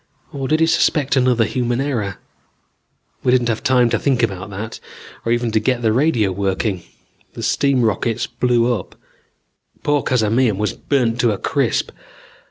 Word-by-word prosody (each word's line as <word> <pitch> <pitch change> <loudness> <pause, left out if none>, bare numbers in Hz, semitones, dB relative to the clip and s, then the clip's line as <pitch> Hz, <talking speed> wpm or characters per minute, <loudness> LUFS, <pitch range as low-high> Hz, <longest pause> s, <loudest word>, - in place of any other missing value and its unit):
Or 135 -1 -3
did 155 +3 +1
he - - +6
suspect 150 -3 +2
another 125 -3 +3
human 120 +1 -1
error? 120 -8 -2 1.1
"We 125 - +2
didn't 125 -2 +2
have 115 - -1
time 130 -3 +3
to - - +1
think 130 -4 +1
about 95 -2 -2
that, 105 +3 -6 0.4
or 115 - -1
even 120 -1 0
to 110 - +2
get 120 +2 -1
the 110 -1 +2
radio 120 -7 +2
working. 95 0 -1 0.5
The - - -7
steam 140 -3 +2
rockets 115 +1 0
blew 120 -1 +1
up. 105 -6 -6 0.9
Poor 145 -1 +2
Cazamian 115 -2 +1
was 105 -2 -1
burnt 120 -4 0
to 120 -3 +3
a - - -4
crisp. - - -1
120 Hz, 165 wpm, -19 LUFS, 110-130 Hz, 1.1 s, he